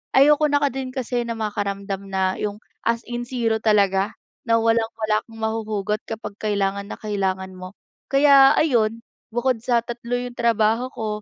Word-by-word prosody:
ayoko 295 Hz, +3 st, +6 dB
na 290 Hz, 0 st, +1 dB
ka 280 Hz, -, +2 dB
din 265 Hz, 0 st, -4 dB
kasi 245 Hz, -2 st, -2 dB
na 230 Hz, -, -3 dB
makaramdam 200 Hz, -2 st, -3 dB
na 190 Hz, -1 st, -1 dB
yung 205 Hz, -1 st, -2 dB, 0.3 s
as 230 Hz, 0 st, +1 dB
in 240 Hz, 0 st, -5 dB
0 230 Hz, -3 st, 0 dB
talaga, 200 Hz, -2 st, +2 dB, 0.3 s
na 230 Hz, -, +4 dB
walang-wala 225 Hz, -1 st, +1 dB
kang 225 Hz, 0 st, -13 dB
mahuhugot 215 Hz, -2 st, -1 dB
kapag 220 Hz, -2 st, -7 dB
kailangan 200 Hz, -1 st, -1 dB
na -, -, -6 dB
kailangan 190 Hz, -3 st, -2 dB
mo. 185 Hz, +1 st, -10 dB, 0.3 s
Kaya 275 Hz, -1 st, +6 dB
ayon, 230 Hz, -6 st, +1 dB, 0.2 s
bukod 240 Hz, +1 st, 0 dB
sa 235 Hz, 0 st, +1 dB
3 240 Hz, +1 st, -4 dB
yung 245 Hz, 0 st, -5 dB
trabaho 230 Hz, +1 st, +2 dB
ko, 220 Hz, -, -3 dB
225 Hz, 160 wpm, -22 LUFS, 205-240 Hz, 0.3 s, ayoko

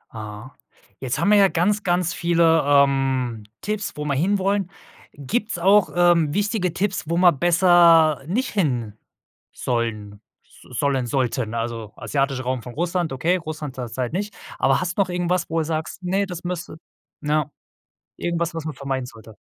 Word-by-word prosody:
Ah. 105 Hz, +3 st, -8 dB, 0.5 s
Jetzt 130 Hz, -1 st, -2 dB
haben 200 Hz, -, +2 dB
wir 210 Hz, -, +7 dB
ja 200 Hz, -1 st, +6 dB
ganz, 195 Hz, +4 st, +1 dB
ganz 175 Hz, -2 st, +1 dB
viele, 170 Hz, -1 st, +3 dB
ähm, 135 Hz, -5 st, +2 dB, 0.2 s
Tipps, 210 Hz, 0 st, -3 dB
wo 150 Hz, -, -4 dB
wir 145 Hz, -, 0 dB
hinwollen. 195 Hz, +4 st, +1 dB, 0.4 s
Gibt's 210 Hz, -, -2 dB
auch, 195 Hz, +3 st, +4 dB
ähm, 175 Hz, -4 st, +3 dB
wichtige 205 Hz, -3 st, 0 dB
Tipps, 190 Hz, 0 st, -1 dB
wo 170 Hz, -, 0 dB
man 175 Hz, -6 st, +4 dB
besser 170 Hz, -3 st, +5 dB
nicht 245 Hz, +9 st, -1 dB
hin 125 Hz, -, -1 dB, 0.6 s
sollen 105 Hz, -4 st, -3 dB, 0.2 s
s 125 Hz, -, -13 dB
sollen 135 Hz, -3 st, 0 dB
sollten? 120 Hz, -3 st, -1 dB
Also, 115 Hz, -2 st, -4 dB
asiatischer 135 Hz, -2 st, -1 dB
Raum 130 Hz, 0 st, -2 dB
von 125 Hz, -, -9 dB
Russland, 175 Hz, 0 st, -1 dB
okay, 165 Hz, +8 st, +1 dB
Russland 155 Hz, -5 st, -6 dB
zurzeit 125 Hz, +1 st, -4 dB
nicht. 205 Hz, +3 st, -3 dB, 0.2 s
Aber 135 Hz, 0 st, +3 dB
hast 175 Hz, -1 st, -3 dB
noch 195 Hz, -, +2 dB
irgendwas, 180 Hz, 0 st, -1 dB
wo 165 Hz, 0 st, 0 dB
du 160 Hz, -, -1 dB
sagst: 160 Hz, +3 st, -4 dB
„Ne, 190 Hz, +3 st, 0 dB
das 180 Hz, -2 st, -7 dB
müsste” 175 Hz, -2 st, -5 dB, 0.4 s
na 150 Hz, 0 st, 0 dB, 0.7 s
irgendwas, 170 Hz, 0 st, -2 dB
was 165 Hz, -2 st, -5 dB
man 155 Hz, -1 st, -4 dB
vermeiden 135 Hz, -2 st, -3 dB
sollte? 110 Hz, -2 st, -14 dB
160 Hz, 160 wpm, -22 LUFS, 130-180 Hz, 0.7 s, wir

